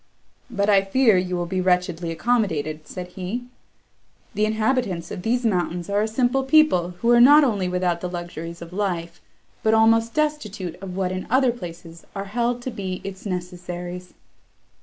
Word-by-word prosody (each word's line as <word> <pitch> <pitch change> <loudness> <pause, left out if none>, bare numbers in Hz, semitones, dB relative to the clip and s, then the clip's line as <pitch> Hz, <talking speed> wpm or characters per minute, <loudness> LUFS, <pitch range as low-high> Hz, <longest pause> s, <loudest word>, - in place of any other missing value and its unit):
"But 200 -4 0
I 200 -2 +5
fear 220 +2 +4
you 180 0 0
will 175 0 -1
be 185 +2 -2
wretchedly 180 -2 0
accommodated," 160 -7 -1
said 180 -1 -7
he: 190 +7 -5 0.9
"the 215 0 +1
inhabitants 220 -5 -1
of - - -5
these 240 +5 0
mountains 180 -3 -1
are 205 +1 +2
a 215 - +1
simple 245 +4 +1
people, 265 - +3
who 235 - +3
are 240 0 +6
not 290 +4 +8
only 205 -8 +1
without 180 -1 0
the 180 - -3
luxuries 175 -1 -6
of 170 +1 -12
life, 175 -4 -3 0.4
but 220 0 +3
almost 225 +1 +3
destitute 230 - -2
of 185 -2 -6
what 185 -1 0
in 185 0 -4
other 260 0 +4
places 170 -6 -10
are 195 0 -4
held 240 +4 -1
to 255 - -3
be 190 -4 -5
its 195 +1 -7
necessaries." 180 0 -6
190 Hz, 170 wpm, -23 LUFS, 180-230 Hz, 0.9 s, not